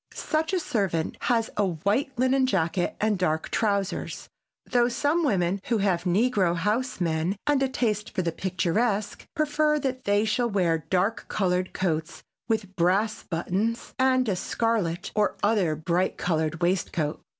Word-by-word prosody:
Such 315 Hz, +1 st, -1 dB
a 375 Hz, -, +1 dB
servant 195 Hz, -, -1 dB
has 230 Hz, -2 st, +1 dB
a 205 Hz, -, +3 dB
white 200 Hz, -, 0 dB
linen 260 Hz, +1 st, +3 dB
jacket 175 Hz, -4 st, 0 dB
and 210 Hz, -3 st, +1 dB
dark 160 Hz, -3 st, 0 dB
trousers, 200 Hz, -3 st, -1 dB, 0.4 s
though 240 Hz, -1 st, +3 dB
some 295 Hz, +7 st, +1 dB
women 195 Hz, -, +1 dB
who 235 Hz, -, +1 dB
have 195 Hz, -4 st, 0 dB
negro 190 Hz, -2 st, +2 dB
house 215 Hz, +8 st, -1 dB
men 165 Hz, +2 st, 0 dB
and 290 Hz, -2 st, +2 dB
a 270 Hz, -, +2 dB
taste 215 Hz, -5 st, -1 dB
for 185 Hz, -, -2 dB
the 170 Hz, -, 0 dB
picturesque 195 Hz, +5 st, -1 dB
prefer 305 Hz, 0 st, +2 dB
that 260 Hz, -3 st, -3 dB
they 205 Hz, +1 st, +3 dB
shall 235 Hz, +2 st, +1 dB
wear 175 Hz, -6 st, +1 dB
dark 190 Hz, +4 st, +1 dB
colored 185 Hz, -2 st, 0 dB
coats 165 Hz, -2 st, -2 dB, 0.2 s
with 215 Hz, -4 st, -2 dB
brass 195 Hz, +6 st, +1 dB
buttons 195 Hz, +7 st, -2 dB
and 260 Hz, -1 st, +3 dB
a 200 Hz, -, +1 dB
scarlet 190 Hz, -4 st, -1 dB
or 210 Hz, -1 st, +1 dB
other 205 Hz, -7 st, +2 dB
bright 170 Hz, +4 st, 0 dB
colored 165 Hz, 0 st, -1 dB
waistcoat. 170 Hz, -4 st, 0 dB
200 Hz, 150 wpm, -26 LUFS, 175-240 Hz, 0.4 s, a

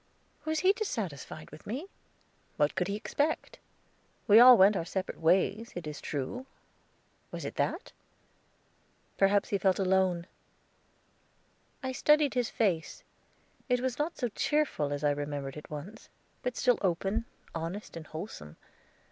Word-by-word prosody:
Was 315 Hz, 0 st, 0 dB
he 375 Hz, +3 st, +5 dB
dissatisfied 195 Hz, -, -5 dB
with 150 Hz, -, -13 dB
me? 260 Hz, -, -4 dB, 0.7 s
What 145 Hz, 0 st, +2 dB
could 180 Hz, -2 st, -1 dB
he 200 Hz, -, -2 dB
expect? 290 Hz, +8 st, -2 dB, 0.7 s
We 215 Hz, +1 st, +8 dB
all 250 Hz, 0 st, +10 dB
went 200 Hz, +2 st, +6 dB
our 180 Hz, -, 0 dB
separate 185 Hz, +3 st, -4 dB
ways, 195 Hz, +7 st, +2 dB
it 175 Hz, -2 st, -5 dB
is 150 Hz, -1 st, -6 dB
true; 155 Hz, -, -4 dB, 0.8 s
was -, -, -6 dB
it -, -, -4 dB
that? -, -, -1 dB, 1.3 s
Perhaps 200 Hz, +1 st, +3 dB
he 200 Hz, -, 0 dB
felt 190 Hz, -1 st, +3 dB
alone. 185 Hz, -2 st, +2 dB, 1.6 s
I 260 Hz, -, -1 dB
studied 300 Hz, +2 st, +3 dB
his 245 Hz, -3 st, 0 dB
face; 180 Hz, -8 st, -1 dB, 0.7 s
it 250 Hz, 0 st, +3 dB
was 255 Hz, +1 st, -2 dB
not 310 Hz, +3 st, -1 dB
so 245 Hz, -, -1 dB
cheerful 270 Hz, -, 0 dB
as 145 Hz, 0 st, -3 dB
I 145 Hz, -, +4 dB
remembered 145 Hz, -1 st, -4 dB
it 150 Hz, -, -10 dB
once, 155 Hz, +9 st, -8 dB, 0.3 s
but 250 Hz, -1 st, -3 dB
still 245 Hz, -2 st, +3 dB
open, 195 Hz, +4 st, 0 dB, 0.3 s
honest, 170 Hz, +5 st, -5 dB
and 160 Hz, -2 st, -8 dB
wholesome. 155 Hz, -, -8 dB
195 Hz, 140 wpm, -30 LUFS, 160-245 Hz, 1.6 s, all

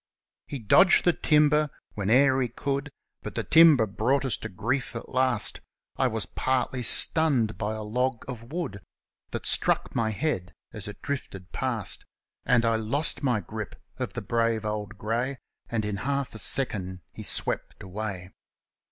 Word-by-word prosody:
He 140 Hz, -, -5 dB
dodged 135 Hz, -, +5 dB
the 175 Hz, -, +5 dB
timber 150 Hz, -1 st, +3 dB, 0.2 s
whene'er 130 Hz, +6 st, +3 dB
he 125 Hz, -, +1 dB
could, 140 Hz, +4 st, -3 dB, 0.3 s
But -, -, -7 dB, 0.2 s
timber 160 Hz, -8 st, +7 dB
brought 135 Hz, +7 st, 0 dB
us 130 Hz, -, +1 dB
to 110 Hz, -, -7 dB
grief 115 Hz, +6 st, -2 dB
at 115 Hz, -, -7 dB
last; 130 Hz, -4 st, 0 dB, 0.3 s
I -, -, +2 dB
was -, -, -1 dB
partly 130 Hz, -1 st, -1 dB
stunned 125 Hz, -2 st, +5 dB
by 110 Hz, +1 st, -2 dB
a 110 Hz, -, -5 dB
log 125 Hz, +3 st, -2 dB
of 120 Hz, -1 st, -8 dB
wood 160 Hz, -, -4 dB, 0.5 s
That -, -, -5 dB
struck -, -, +3 dB
my 115 Hz, -2 st, 0 dB
head 100 Hz, -, -2 dB, 0.2 s
as 105 Hz, -3 st, -6 dB
it 105 Hz, -, -10 dB
drifted 95 Hz, -10 st, -5 dB
past; -, -, -3 dB, 0.4 s
Then 125 Hz, -2 st, +4 dB, 0.3 s
lost 145 Hz, +5 st, 0 dB
my 125 Hz, -7 st, +1 dB
grip 110 Hz, 0 st, -7 dB, 0.2 s
of -, -, -4 dB
the -, -, -5 dB
brave 115 Hz, -2 st, 0 dB
old 105 Hz, -1 st, -4 dB
grey, 120 Hz, +6 st, -2 dB, 0.3 s
And 110 Hz, -2 st, -1 dB
in 105 Hz, -1 st, -3 dB
half 140 Hz, +3 st, -2 dB
a 110 Hz, -, -6 dB
second 95 Hz, -10 st, +1 dB
he -, -, -10 dB
swept -, -, -2 dB
away. 95 Hz, -1 st, -6 dB
120 Hz, 155 wpm, -26 LUFS, 105-140 Hz, 0.5 s, timber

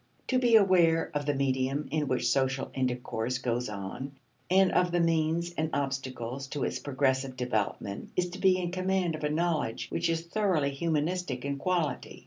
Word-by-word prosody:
To 255 Hz, -, +3 dB
be 240 Hz, -2 st, +4 dB
aware 175 Hz, -6 st, +4 dB
of 145 Hz, -1 st, -2 dB
the 145 Hz, -, +1 dB
medium 135 Hz, +1 st, 0 dB
in 155 Hz, -1 st, 0 dB
which 130 Hz, -1 st, 0 dB
social 135 Hz, 0 st, +1 dB
intercourse 125 Hz, -2 st, -1 dB
goes 125 Hz, -2 st, -2 dB
on, 105 Hz, +7 st, -6 dB, 0.4 s
and 190 Hz, +1 st, +5 dB
of 180 Hz, 0 st, +3 dB
the 175 Hz, -, +2 dB
means 165 Hz, +1 st, +1 dB
and 160 Hz, -2 st, -1 dB
obstacles 135 Hz, -2 st, -3 dB
to 140 Hz, -1 st, -3 dB
its -, -, -1 dB
progressive 130 Hz, -1 st, 0 dB
development 110 Hz, -5 st, -2 dB
is 180 Hz, -1 st, 0 dB
to 185 Hz, -, -7 dB
be 190 Hz, -1 st, +4 dB
in 175 Hz, -1 st, -2 dB
command 185 Hz, -1 st, 0 dB
of 155 Hz, -, -6 dB
a 150 Hz, -, +1 dB
knowledge 150 Hz, -8 st, -1 dB
which -, -, 0 dB
is 165 Hz, 0 st, 0 dB
thoroughly 170 Hz, -6 st, +1 dB
humanistic 155 Hz, -2 st, -1 dB
in 140 Hz, 0 st, -2 dB
quality. 175 Hz, -1 st, -1 dB
145 Hz, 175 wpm, -29 LUFS, 130-175 Hz, 0.4 s, and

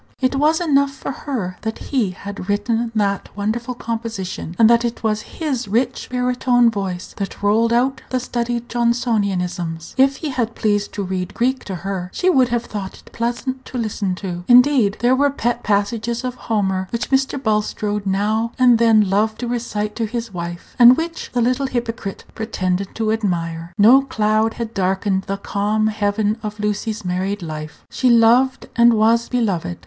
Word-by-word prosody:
It 255 Hz, 0 st, +1 dB
was 310 Hz, +3 st, +3 dB
enough 280 Hz, -5 st, +3 dB
for 275 Hz, -, -5 dB
her 225 Hz, -10 st, -4 dB
that 220 Hz, 0 st, -3 dB
he 250 Hz, -8 st, -1 dB
had 200 Hz, +1 st, -8 dB
written 225 Hz, +3 st, 0 dB
that 200 Hz, -2 st, 0 dB
wonderful 235 Hz, +4 st, -2 dB
composition, 225 Hz, -8 st, -5 dB
and 225 Hz, -, +6 dB
that 235 Hz, +1 st, +4 dB
it 235 Hz, 0 st, -3 dB
was 215 Hz, -1 st, 0 dB
his 265 Hz, -3 st, -4 dB
rich 245 Hz, +5 st, -1 dB
baritone 250 Hz, -1 st, +2 dB
voice 190 Hz, -4 st, -4 dB
that 200 Hz, 0 st, -5 dB
rolled 225 Hz, +3 st, +3 dB
out 260 Hz, +3 st, +1 dB
the 255 Hz, -, 0 dB
studied 240 Hz, -1 st, -3 dB
Johnsonianisms. 200 Hz, -9 st, -1 dB
If 270 Hz, +1 st, +5 dB
he 305 Hz, -, -4 dB
had 235 Hz, -4 st, -2 dB
pleased 205 Hz, -1 st, 0 dB
to 205 Hz, -, -3 dB
read 185 Hz, -1 st, -4 dB
Greek 260 Hz, +2 st, 0 dB
to 190 Hz, -, -4 dB
her, 180 Hz, 0 st, -4 dB
she 370 Hz, -, +3 dB
would 260 Hz, -6 st, +4 dB
have 240 Hz, 0 st, -1 dB
thought 195 Hz, -3 st, -6 dB
it -, -, -18 dB
pleasant 245 Hz, +2 st, -3 dB
to 255 Hz, -, -6 dB
listen. 205 Hz, -5 st, -2 dB, 0.3 s
Indeed, 250 Hz, -4 st, +5 dB
there 245 Hz, +2 st, +4 dB
were 285 Hz, +2 st, +3 dB
pet 240 Hz, -3 st, -1 dB
passages 220 Hz, +3 st, -1 dB
of 250 Hz, -1 st, -2 dB
Homer 190 Hz, -6 st, -1 dB
which 235 Hz, +4 st, -3 dB
Mr. 270 Hz, +1 st, +2 dB
Bulstrode 210 Hz, -3 st, -1 dB
now 215 Hz, +4 st, 0 dB
and 245 Hz, -3 st, +5 dB
then 220 Hz, -3 st, +5 dB
loved 215 Hz, +3 st, +1 dB
to 245 Hz, -, -2 dB
recite 220 Hz, -3 st, -3 dB
to 225 Hz, -2 st, -1 dB
his 230 Hz, -1 st, -5 dB
wife, 170 Hz, -1 st, -7 dB
and 245 Hz, +2 st, +9 dB
which 330 Hz, +1 st, -4 dB
the 245 Hz, -, 0 dB
little 255 Hz, +3 st, +1 dB
hypocrite 235 Hz, -5 st, -4 dB
pretended 190 Hz, -3 st, -2 dB
to 220 Hz, -1 st, 0 dB
admire. 170 Hz, -6 st, -2 dB
No 235 Hz, +6 st, +7 dB
cloud 220 Hz, -3 st, 0 dB
had 230 Hz, -1 st, -5 dB
darkened 190 Hz, 0 st, 0 dB
the 195 Hz, -, -2 dB
calm 205 Hz, +2 st, -1 dB
heaven 210 Hz, +1 st, 0 dB
of 210 Hz, -1 st, -6 dB
Lucy's 210 Hz, 0 st, -2 dB
married 185 Hz, +2 st, -2 dB
life. 155 Hz, -1 st, -7 dB
She 255 Hz, -, +1 dB
loved 240 Hz, +3 st, +4 dB
and 235 Hz, 0 st, +6 dB
was 225 Hz, +2 st, +3 dB
beloved. 195 Hz, -, -1 dB
225 Hz, 175 wpm, -20 LUFS, 200-245 Hz, 0.3 s, and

